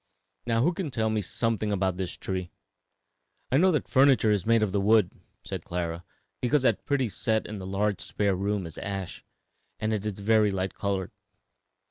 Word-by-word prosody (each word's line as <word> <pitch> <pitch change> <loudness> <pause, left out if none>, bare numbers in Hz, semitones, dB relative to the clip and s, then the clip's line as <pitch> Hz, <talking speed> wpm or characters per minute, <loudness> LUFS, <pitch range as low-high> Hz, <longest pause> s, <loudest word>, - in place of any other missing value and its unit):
Now 115 0 +2
who 175 +5 +3
can 170 -3 -3
tell 110 -4 0
me 110 -1 0
something 110 0 -1
about 95 -2 0
this 95 -2 -3
tree?" 95 -2 -4 1.0
"I 130 - +4
know 185 +4 +5
that 150 - 0
furniture 130 -5 +4
is 105 -1 0
made 115 -1 +4
of 105 - 0
the 100 0 +1
wood," 105 -2 +4 0.3
said - - -5
Clara, 85 -1 -3 0.4
"because 130 +3 +2
that - - +2
pretty 140 -3 +1
set 110 +1 0
in 105 -1 -6
the 95 - -7
large 100 +1 0
spare 100 -2 0
room 100 0 -1
is 80 -1 -7
ash. 95 -2 -5 0.6
And 110 0 0
it 105 -2 -2
is 105 -1 -2
very 105 +1 +3
light 95 -1 -2
colored." 95 -2 -2
105 Hz, 185 wpm, -27 LUFS, 95-115 Hz, 1.0 s, know